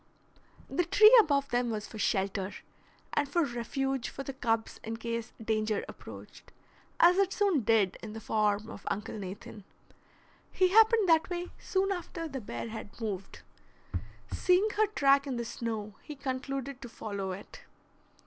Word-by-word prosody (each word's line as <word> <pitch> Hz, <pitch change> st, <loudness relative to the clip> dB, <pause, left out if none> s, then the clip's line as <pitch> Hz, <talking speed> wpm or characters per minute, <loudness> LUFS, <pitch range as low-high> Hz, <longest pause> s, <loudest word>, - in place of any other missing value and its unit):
The 355 Hz, -, 0 dB
tree 430 Hz, +7 st, +7 dB
above 280 Hz, -6 st, +1 dB
them 245 Hz, 0 st, +1 dB
was 215 Hz, -2 st, -3 dB
for 220 Hz, -, -9 dB
shelter, 195 Hz, -1 st, 0 dB, 0.6 s
and 290 Hz, -1 st, +1 dB
for 340 Hz, +4 st, +2 dB
refuge 265 Hz, +1 st, -2 dB
for 275 Hz, -, -6 dB
the 275 Hz, -, -5 dB
cubs 225 Hz, -3 st, -1 dB
in 225 Hz, +1 st, -4 dB
case 230 Hz, 0 st, -4 dB
danger 215 Hz, -1 st, 0 dB
approached, -, -, -11 dB, 0.5 s
as 350 Hz, +2 st, +7 dB
it 390 Hz, -1 st, +3 dB
soon 390 Hz, -8 st, +2 dB
did 215 Hz, -4 st, +2 dB
in 215 Hz, -1 st, -7 dB
the 220 Hz, -, -6 dB
form 210 Hz, -1 st, +1 dB
of 200 Hz, -, -10 dB
Uncle 210 Hz, +1 st, -3 dB
Nathan. 205 Hz, +2 st, -8 dB, 0.9 s
He 370 Hz, -1 st, +3 dB
happened 445 Hz, +1 st, +6 dB
that 325 Hz, 0 st, +4 dB
way 355 Hz, 0 st, -4 dB
soon 390 Hz, -1 st, 0 dB
after 345 Hz, -2 st, -4 dB
the 270 Hz, -4 st, -5 dB
bear 200 Hz, -, -5 dB
had 220 Hz, -1 st, -8 dB
moved. 200 Hz, -4 st, -5 dB, 0.9 s
Seeing 370 Hz, +4 st, +3 dB
her 430 Hz, +1 st, +2 dB
track 280 Hz, -7 st, +3 dB
in 265 Hz, -, -2 dB
the 235 Hz, 0 st, -3 dB
snow, 220 Hz, -3 st, -4 dB
he 300 Hz, -, -8 dB
concluded 270 Hz, 0 st, -4 dB
to 245 Hz, -, -7 dB
follow 200 Hz, -4 st, -4 dB
it. 190 Hz, +2 st, -9 dB
245 Hz, 160 wpm, -30 LUFS, 215-330 Hz, 0.9 s, tree